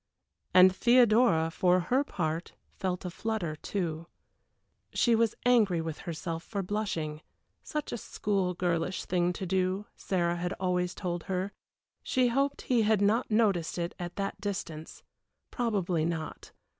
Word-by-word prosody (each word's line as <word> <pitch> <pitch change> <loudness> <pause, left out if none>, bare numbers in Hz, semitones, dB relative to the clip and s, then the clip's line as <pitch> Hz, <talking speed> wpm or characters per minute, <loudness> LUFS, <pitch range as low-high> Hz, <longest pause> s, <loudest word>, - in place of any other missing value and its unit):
And 185 0 +7
Theodora, 230 -8 +4
for 180 +1 +3
her 250 +10 +1
part, 165 - -3 0.2
felt 185 -1 -3
a 180 - -3
flutter 200 -6 -2
too. 165 -1 -3 0.9
She 240 - +4
was 225 -1 +2
angry 220 -8 +4
with 160 -1 -4
herself 165 0 -4
for 200 +1 -3
blushing, 175 -7 -3 0.4
such 300 -1 -4
a 240 - -3
school 195 -3 -1
girlish 175 +1 -1
thing 175 -1 +1
to 190 - -5
do, 185 +2 0
Sarah 175 -2 0
had 175 +2 -2
always 180 -2 -1
told 175 -3 -3
her. 190 +1 -2 0.5
She 255 -1 +2
hoped 275 +3 0
he 245 -3 +2
had 215 -1 +3
not 210 +5 +2
noticed 205 -8 +2
it 170 0 -2
at 175 -1 -5
that 195 -1 -3
distance 165 -6 -5 0.5
probably 190 -9 0
not. 160 -1 -4
185 Hz, 145 wpm, -30 LUFS, 170-215 Hz, 0.9 s, And